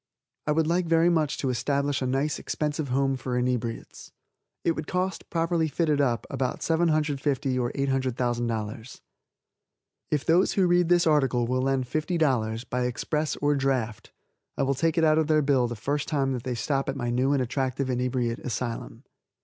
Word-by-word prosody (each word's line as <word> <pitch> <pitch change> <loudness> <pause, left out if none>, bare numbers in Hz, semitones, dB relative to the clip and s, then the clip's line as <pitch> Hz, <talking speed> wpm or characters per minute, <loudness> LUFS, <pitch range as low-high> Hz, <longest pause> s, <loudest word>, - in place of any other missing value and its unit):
I - - +2
would 160 +1 +2
like 170 +2 +1
very 165 +1 +4
much 155 -4 +1
to 135 - -1
establish 140 +3 0
a 130 - 0
nice, 135 +4 0
expensive 150 -1 -2
home 135 +1 +1
for 125 -1 -3
inebriates. 125 -2 -3 0.5
It - - +3
would 155 -2 -4
cost, 185 +1 -2
properly 165 -1 +1
fitted 150 -1 +1
up, 120 -4 0
about 130 -2 -2
$750,000 150 -5 +1
or 120 - -1
$800,000. 120 -4 -2 1.1
If 150 -2 0
those 175 +4 +3
who 195 - +3
read 175 -1 +3
this 175 -1 +4
article 135 -6 +2
will 130 +2 0
lend 135 -1 +1
$50, 130 -7 0
by 125 0 0
express 150 +4 -1
or 145 0 +1
draft, 130 -6 -1 0.5
I - - +1
will 135 0 +1
take 165 +4 0
it 165 - +3
out 155 0 +4
of 155 - +1
their 155 -1 +3
bill 135 -3 +3
the 120 - -5
first 145 +7 -2
time 135 -3 0
they 130 - -6
will 125 - -1
stop 135 +4 -1
at 135 - -2
my 120 -3 -2
new 130 +3 +1
and 140 - +2
attractive 130 +1 -2
inebriate 125 -1 -1
asylum. 120 -1 -5
135 Hz, 175 wpm, -26 LUFS, 125-155 Hz, 1.1 s, very